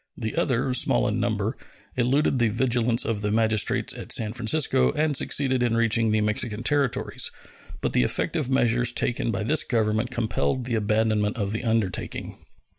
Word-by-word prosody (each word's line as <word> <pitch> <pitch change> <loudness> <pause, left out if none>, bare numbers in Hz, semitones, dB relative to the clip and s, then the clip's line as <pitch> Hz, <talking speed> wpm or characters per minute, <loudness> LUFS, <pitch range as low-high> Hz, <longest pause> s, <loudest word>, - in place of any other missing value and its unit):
The 110 -3 -4
other, 125 0 0
small 125 - +2
in - - -1
number, - - -1 0.4
eluded 130 +2 +1
the 120 - +3
vigilance 120 +1 +1
of 110 -3 -2
the 105 - -1
magistrates 110 -1 +1
at - - -8
San 110 -2 +1
Francisco 120 - +2
and 155 -1 0
succeeded 130 -1 +1
in 120 -2 +1
reaching 115 -1 +2
the 110 0 +1
Mexican 105 +1 -1
territories; 140 -2 0 0.5
but - - -2
the - - +3
effective 125 - -1
measures 120 -2 +2
taken 120 0 -1
by 100 -3 -2
this 150 +7 +2
Government 110 -1 0
compelled 120 - -1
the 120 - -3
abandonment 110 0 +1
of 100 -2 -2
the 110 - -3
undertaking. 110 -6 -2
115 Hz, 165 wpm, -25 LUFS, 110-125 Hz, 0.5 s, the